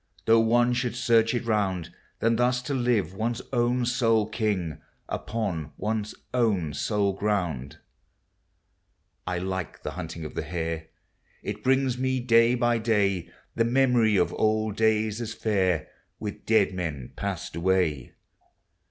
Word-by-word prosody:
Though 115 0 +6
one 120 +2 +3
should 120 0 -1
search 115 -1 +3
it 120 - -2
round, 95 -6 0 0.3
Than 115 0 +3
thus 125 +1 +2
to 140 - -3
live 120 -9 +1
one's 115 +3 -2
own 120 0 +2
sole 115 -3 +2
king, 105 -8 -2 0.3
Upon 90 -10 -3
one's 105 -1 -2 0.2
own 100 -11 +1
sole 100 +6 0
ground. 90 -10 -1
THE - - -17
SEASONS. 90 -1 -12
107 - - -3
I - - -3
like 95 -3 -4
the - - -3
hunting 80 0 -6
<>i' - - -4
the - - -4
hare; 80 -2 -4 0.6
It 105 +1 -5
brings 130 -1 +2
me, 130 0 +1
day 115 0 +4
by 120 -1 +2
day, 100 -5 +1 0.2
The 115 - +2
memory 120 -4 +3
of 90 - +2
old 110 -1 +1
days 110 0 +1
as 115 -1 -4
fair, 95 -7 +1 0.3
With 105 0 -7
dead 110 -4 +4
men 80 -8 -4
passed - - -4
away. 85 -6 0
110 Hz, 150 wpm, -26 LUFS, 90-120 Hz, 0.6 s, Though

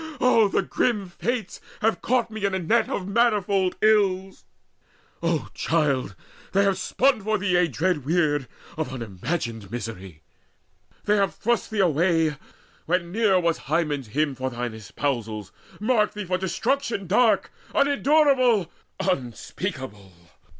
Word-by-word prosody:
Oh, 230 -4 +5
the - - 0
grim 210 -7 0
fates 235 +6 -3 0.2
have 215 -4 +1
caught 245 -2 +1
me 220 -1 -6
in 200 -1 +1
a - - +1
net 220 +6 +1
Of 185 - -3
manifold 200 -4 +2
ills! 195 -3 +2 0.8
O 165 -2 -1
child, 140 -10 0 0.4
they 200 +1 +4
have 195 -1 +1
spun 255 +4 +2
for 215 +2 0
thee 180 -3 +2
Dread 160 +1 -1
weird 145 -3 +1 0.3
of 160 -3 -2
unimagined 115 - -4
misery! 95 -8 -7 0.8
They 210 0 +2
have 195 -6 +1
thrust 235 +6 0
thee 215 -2 0
away, 165 -2 +2 0.5
when 170 0 0
near 205 -2 +3
was 170 -2 0
Hymen's 150 -5 0
hymn, 145 +6 0
From 130 0 -4
thine 120 -1 -3
espousals, 110 -1 -4 0.3
marked 215 -1 +1
thee 210 -1 -4
for 185 0 -1
destruction 225 +3 -1
Dark, 210 +2 +3 0.2
unendurable, 275 - +3 0.4
unspeakable! 130 - -4
180 Hz, 130 wpm, -24 LUFS, 140-210 Hz, 0.8 s, Oh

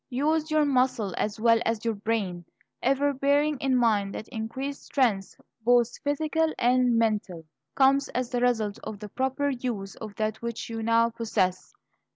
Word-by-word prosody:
Use 305 +5 0
your 310 -1 +3
muscle 255 -7 +1
as 210 +1 -2
well 230 0 +4
as 225 0 -2
your 230 - +1
brain, 200 -4 -2 0.4
ever 275 +2 +2
bearing 285 +1 +1
in 270 -1 +1
mind 210 -5 +1
that 215 - -6
increased 260 +4 -5
strength, 220 -8 0 0.2
both 240 0 +3
physical 315 +2 0
and 245 -1 +3
mental, 210 -7 -1 0.3
comes 275 +1 +4
as 250 0 -3
the 245 -1 -1
result 220 -5 +1
of 215 - -6
the 210 0 -9
proper 265 +4 -1
use 240 -6 -4
of 215 -2 -8
that 215 +1 -2
which 235 0 -5
you 225 0 -4
now 230 +1 +3
possess. 215 -5 -1
235 Hz, 165 wpm, -27 LUFS, 215-270 Hz, 0.4 s, well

